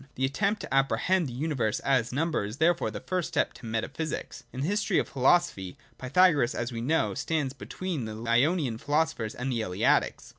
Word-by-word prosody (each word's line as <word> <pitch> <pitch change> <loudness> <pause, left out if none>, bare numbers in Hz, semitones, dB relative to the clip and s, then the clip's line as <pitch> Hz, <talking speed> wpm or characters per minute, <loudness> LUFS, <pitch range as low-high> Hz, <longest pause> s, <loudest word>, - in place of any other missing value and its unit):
The 130 - +1
attempt 200 +9 0
to 135 - -6
apprehend 155 +6 +2
the - - -6
universe 130 -5 -1
as 130 -4 +1
number 160 0 0
is 105 +4 -6
therefore 170 +3 +2
the - - -6
first 185 -3 -2
step - - 0
to 125 - -11
metaphj^sics. 135 +8 -4
In 130 - -5
the 145 - 0
history 205 -1 +1
of - - +1
philosophy, 130 - +1 0.2
Pythagoras, 145 -1 +3
as 120 +1 -3
we 115 -1 -4
know, 155 +7 +1
stands 150 -5 -1
between 160 -1 -5
the 110 0 -6
Ionian 125 0 +2
philosophers 145 -7 -1
and 130 +2 -3
the 115 -2 -1
Eleatics. 90 -4 +1
135 Hz, 185 wpm, -28 LUFS, 120-165 Hz, 0.2 s, Pythagoras